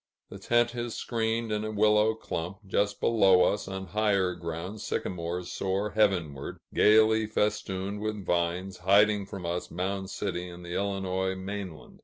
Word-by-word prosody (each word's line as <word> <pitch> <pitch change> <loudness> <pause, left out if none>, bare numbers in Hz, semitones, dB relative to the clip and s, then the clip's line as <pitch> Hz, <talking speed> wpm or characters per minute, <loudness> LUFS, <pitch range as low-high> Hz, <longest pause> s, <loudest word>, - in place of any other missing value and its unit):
The - - -8
tent 120 0 +2
is 120 -1 -4
screened 115 -1 -1
in 105 0 -1
a 110 - -3
willow 105 +1 +3
clump; 95 -2 -5
just 100 +1 0
below 95 -5 +5
us, 105 +2 0
on 95 0 -5
higher 100 -2 +1
ground, 85 +5 -6
sycamores 90 0 -3
soar 100 +2 -1
heavenward, 90 -10 0 0.2
gayly 110 +1 +5
festooned 105 -2 -1
with 105 -2 -3
vines, 90 +2 -1
hiding 100 +2 +4
from 100 -3 -7
us 85 +1 -3
Mound 95 +2 -3
City 90 -3 -3
and 85 0 -10
the 85 - -6
Illinois 95 -1 -1
mainland. 95 -3 -7
100 Hz, 150 wpm, -28 LUFS, 90-105 Hz, 0.2 s, below